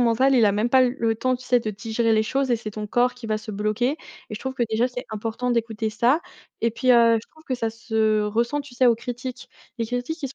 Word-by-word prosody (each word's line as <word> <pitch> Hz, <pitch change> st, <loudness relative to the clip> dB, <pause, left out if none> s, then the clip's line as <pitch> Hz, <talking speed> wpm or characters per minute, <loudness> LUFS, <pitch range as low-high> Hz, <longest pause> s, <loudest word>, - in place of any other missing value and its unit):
mental 245 Hz, +3 st, +3 dB
il 240 Hz, -3 st, +5 dB
a -, -, +4 dB
même 215 Hz, +4 st, 0 dB
pas 260 Hz, 0 st, +6 dB
l 250 Hz, +1 st, +1 dB
le 225 Hz, -1 st, +1 dB
temps, 255 Hz, +3 st, 0 dB
tu 250 Hz, -, -14 dB
sais 250 Hz, -1 st, +3 dB
de 220 Hz, -, -3 dB
digérer 225 Hz, +3 st, -1 dB
les 215 Hz, -, +4 dB
choses 270 Hz, +3 st, 0 dB
et 240 Hz, -, +3 dB
c'est 220 Hz, -1 st, -6 dB
ton 210 Hz, 0 st, -5 dB
corps 245 Hz, +3 st, +2 dB
qui 250 Hz, -2 st, -9 dB
va 215 Hz, 0 st, 0 dB
se 215 Hz, 0 st, -8 dB
bloquer. 215 Hz, +5 st, 0 dB, 0.4 s
Et -, -, -4 dB
je 210 Hz, -, -7 dB
trouve 265 Hz, 0 st, -4 dB
que 250 Hz, -, -1 dB
déjà 225 Hz, +3 st, +1 dB
c'est 245 Hz, 0 st, -6 dB
important 225 Hz, +3 st, -3 dB
d'écouter 225 Hz, -2 st, -1 dB
ça. 240 Hz, +8 st, +2 dB, 0.4 s
Et 230 Hz, -, +2 dB
puis, 255 Hz, +3 st, +1 dB
heu, 230 Hz, -2 st, +6 dB
je -, -, -18 dB
trouve 315 Hz, 0 st, -21 dB
que 260 Hz, -, -2 dB
ça 225 Hz, -2 st, -2 dB
se 220 Hz, -1 st, 0 dB
ressent 235 Hz, +7 st, 0 dB
tu 275 Hz, -3 st, -14 dB
sais 255 Hz, 0 st, +3 dB
aux 235 Hz, -2 st, +5 dB
critiques? 245 Hz, +2 st, -6 dB, 0.3 s
Les 230 Hz, -, -1 dB
critiques 245 Hz, +7 st, -3 dB
qui 285 Hz, -, -3 dB
sont 265 Hz, -, -12 dB
235 Hz, 280 wpm, -24 LUFS, 220-250 Hz, 0.4 s, pas